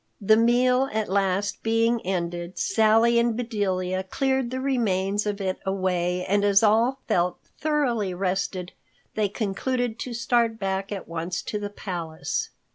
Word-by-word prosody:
The 215 +1 +5
meal 250 +3 +3
at 220 -2 -1
last 195 +1 0
being 230 +1 +2
ended, 175 -1 -3
Sally 225 +3 +4
and 235 -1 +1
Bedelia 190 -6 -1
cleared 265 +5 0
the 260 +1 -3
remains 210 -6 0
of 205 0 -2
it 190 -1 -2
away, 180 -2 -1
and 200 +1 +1
as 205 +1 +4
all 230 +5 +3
felt 175 0 +1 0.2
thoroughly 255 -10 0
rested, 185 -1 -2 0.4
they 210 -2 0
concluded 230 +3 -2
to 245 -2 -4
start 230 -1 +1
back 195 -1 -2
at 200 -2 -5
once 170 +2 -4
to 210 - -3
the 205 0 -4
palace. 175 -6 -4
205 Hz, 145 wpm, -25 LUFS, 185-235 Hz, 0.4 s, The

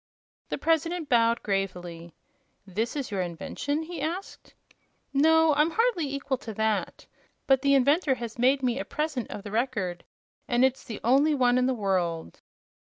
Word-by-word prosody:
The - - -2
President 330 0 0
bowed 230 -1 +3
gravely. 180 -4 -3 0.5
"This 215 +7 -3
is 275 -6 -4
your 195 -2 -1
invention?" 235 - -3
he 330 -2 -7
asked. 340 +6 -5 0.6
"No; 320 +2 +5
I'm 300 +3 +3
hardly 375 - 0
equal 275 -2 -2
to 220 -4 -8
that. 220 0 -1 0.4
But 270 -1 +4
the 280 0 +4
inventor 280 +2 +3
has 235 -1 -7
made 265 +2 +3
me 250 +1 0
a - - -2
present 300 -6 -3
of 205 - -7
the 205 - -8
Record, 215 -7 -2 0.4
and 245 +1 +3
it's 265 0 -1
the 225 -5 -6
only 280 +6 +4
one 250 -2 +3
in 250 - +2
the 260 - 0
world." 180 - -2
255 Hz, 165 wpm, -27 LUFS, 215-295 Hz, 0.6 s, No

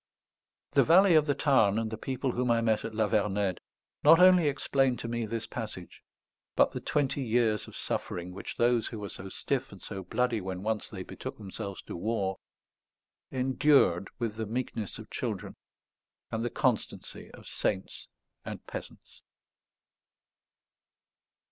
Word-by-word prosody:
The - - +5
valley 185 +3 +6
of 155 -1 +5
the 145 - +2
Tarn 120 -9 +4
and 110 -1 -1
the - - -2
people 130 +3 -2
whom 125 0 -1
I 115 0 +4
met 110 -2 +1
at 115 -1 -5
La 110 -1 +2
Vernède 100 -3 +1 0.4
not 160 +3 +8
only 180 -3 +7
explain 135 -2 +1
to - - -5
me 115 -1 -2
this 115 +1 -3
passage, 105 -7 -7 0.5
but - - +4
the - - -4
twenty 140 -1 0
years 115 -4 +1
of - - -12
suffering 90 +1 -3
which 95 - -7
those, 120 -1 +3
who 115 - -6
were 100 -1 -5
so 95 - -7
stiff 135 +5 -2
and 100 - -11
so 100 0 -5
bloody 115 +3 0
when 95 0 -5
once 110 0 -1
they 95 -4 -6
betook - - -7
themselves 100 -1 -6
to - - -7
war, 95 0 -1 0.9
endured 130 - +3
with 115 -3 -3
the 110 -1 -3
meekness 115 -2 -3
of - - -11
children - - -4 0.8
and 110 0 -1
the 120 - 0
constancy - - -2
of - - -15
saints 95 -2 -2 0.4
and - - -7
peasants. - - -9
115 Hz, 155 wpm, -30 LUFS, 100-130 Hz, 0.9 s, not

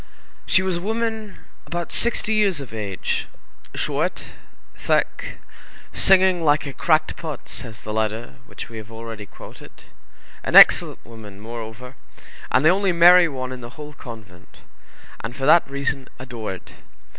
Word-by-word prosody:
She 185 - +3
was 185 -2 -1
a - - -6
woman 220 0 -3 0.3
about 175 0 -4
sixty 230 -2 +1
years 200 -6 +2
of 135 -5 -9
age, 100 -4 -3 0.5
short, - - -2 0.5
thick, - - -1 0.6
"singing 185 -2 +5
like 150 -1 +2
a 140 - -6
cracked 155 0 +1
pot," 155 -4 -7
says 115 -4 -7
the 105 - -6
letter 110 +3 -3
which - - -9
we 115 - -10
have 110 0 -10
already 115 -2 -8
quoted; - - -14 0.6
an - - -2
excellent - - +7
woman, 110 -4 -12
moreover, 115 +3 -8 0.6
and 130 - +3
the - - +8
only 195 +1 +2
merry 175 +1 +7
one 130 -2 -5
in 130 -1 -7
the 120 +3 -11
whole 150 0 -9
convent, 105 -9 -13 0.6
and 115 +2 -6
for 135 - -4
that 155 0 +5
reason 140 -1 -3
adored. 115 -7 -7
135 Hz, 145 wpm, -22 LUFS, 115-175 Hz, 0.6 s, the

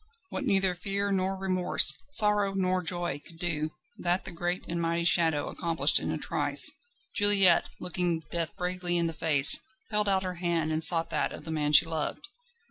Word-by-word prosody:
What 275 - -4
neither 195 -3 +1
fear 200 +3 -3
nor 190 0 -1
remorse, 185 -6 +4 0.2
sorrow 210 -6 +2
nor 185 -1 -1
joy, 175 -4 -3
could 165 - -15
do, 160 -3 -3 0.3
that 175 +1 -2
the 190 - -3
great 175 +1 -4
and 170 0 -4
mighty 170 0 -1
Shadow 165 -4 +1
accomplished 165 -2 +1
in - - -5
a - - -3
trice. - - +2 0.4
Juliette, 200 -4 +5
looking 175 -2 -2
death 165 -2 -3
bravely 180 -1 -2
in 170 - 0
the 165 - -3
face, 150 -3 +4 0.3
held 210 -1 +1
out 190 -1 0
her 180 -2 -6
hand, 165 -3 -1
and 155 +1 -1
sought 165 -1 +4
that - - -2
of - - -11
the 160 - -6
man 150 -2 -2
she 150 - +6
loved. 160 - -4
175 Hz, 185 wpm, -27 LUFS, 165-190 Hz, 0.4 s, she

